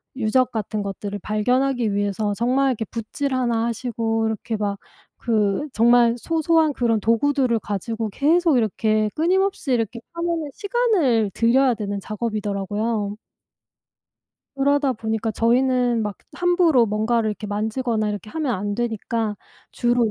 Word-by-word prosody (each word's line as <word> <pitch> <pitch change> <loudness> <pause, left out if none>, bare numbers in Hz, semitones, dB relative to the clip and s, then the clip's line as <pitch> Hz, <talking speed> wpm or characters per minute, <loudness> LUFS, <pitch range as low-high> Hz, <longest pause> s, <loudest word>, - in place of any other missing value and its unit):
유적 255 +1 +1
같은 215 -1 -3
것들을 200 +1 -5
발견하기 245 +1 +1
위해서 205 0 -1
정말 255 +4 +1
이렇게 230 -3 -2
붓질 250 +6 -4
하나 235 -3 +1
하시고 225 -1 -1
이렇게 220 +1 -3
막 205 -1 -2 0.5
그 215 +3 +1
정말 235 +1 +4
소소한 320 +1 +2
그런 230 -4 +1
도구들을 235 +1 +2
가지고 215 +2 -3
계속 315 - +3
이렇게 215 -1 +1
끊임없이 370 -1 +1
이렇게 230 -1 0
하면은 335 -3 -2
시간을 380 - +1
들여야 250 +2 +3
되는 205 -2 -4
작업이더라고요. 210 0 -2 1.4
그러다 280 0 +2
보니까 220 0 -2
저희는 245 +1 +2
막 210 -2 -4 0.2
함부로 350 -9 +3
뭔가를 220 +1 0
이렇게 210 0 -6
만지거나 215 +2 -1
이렇게 210 +1 -5
하면 295 -7 -1
안 205 +2 -3
되니까 225 -2 -2 0.3
주로 240 -2 +1
230 Hz, 325 characters per minute, -22 LUFS, 215-265 Hz, 1.4 s, 정말